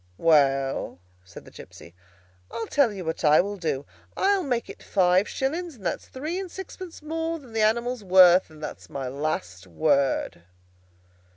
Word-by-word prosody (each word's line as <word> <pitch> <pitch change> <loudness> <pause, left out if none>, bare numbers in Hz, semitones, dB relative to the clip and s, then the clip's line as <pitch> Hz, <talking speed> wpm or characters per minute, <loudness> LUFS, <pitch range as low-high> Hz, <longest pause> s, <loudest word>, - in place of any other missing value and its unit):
"Well," 135 - +2 0.3
said 90 -1 -13
the - - -14
gipsy, 85 - -13 0.6
"I'll 230 - -4
tell 280 -4 +2
you 190 -4 -7
what 160 +1 -4
I 150 0 +6
will 200 +3 0
do. 155 -7 -3 0.3
I'll 395 0 +2
make 250 -7 -2
it - - -11
five 185 0 +2
shillings, 320 +4 -3
and 200 -6 -15
that's 170 - -3
three 310 +8 -4
and 385 -2 -5
sixpence 370 -3 -9
more 325 +1 -3
than 260 -7 -15
the 225 - 0
animal's 235 +2 +1
worth. 185 -1 +6
And 155 -1 -14
that's - - -8
my 135 -2 -5
last 125 - -4
word." 140 - 0
190 Hz, 165 wpm, -25 LUFS, -, 0.6 s, I